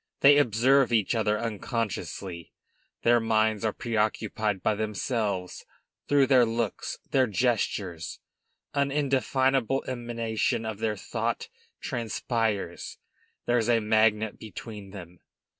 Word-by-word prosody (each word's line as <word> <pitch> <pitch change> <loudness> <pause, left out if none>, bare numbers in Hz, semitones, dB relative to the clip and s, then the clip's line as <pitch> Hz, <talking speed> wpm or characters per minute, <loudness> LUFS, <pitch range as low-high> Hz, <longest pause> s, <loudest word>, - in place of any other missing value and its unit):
They 145 +1 +8
observe 130 +1 +3
each 110 -2 +2
other 110 -2 +1
unconsciously; 105 -5 -4 0.5
their 120 0 +5
minds 110 -1 +1
are 110 - +1
preoccupied 110 -3 -1
by 110 - +3
themselves; 105 -2 -2 0.4
through 145 -1 +4
their 130 -2 +5
looks, 115 -2 -2
their 130 -2 +3
gestures, 100 -6 -1 0.5
an 140 -1 +1
indefinable 135 -2 +1
emanation 115 -3 -2
of 110 -2 -4
their 110 -1 -1
thought - - -3 0.3
transpires; 110 -5 -2 0.5
there's 120 -1 +1
a 115 -1 +4
magnet 110 0 +2
between 105 -2 -9
them. 90 -3 -11
110 Hz, 110 wpm, -27 LUFS, 105-120 Hz, 0.5 s, They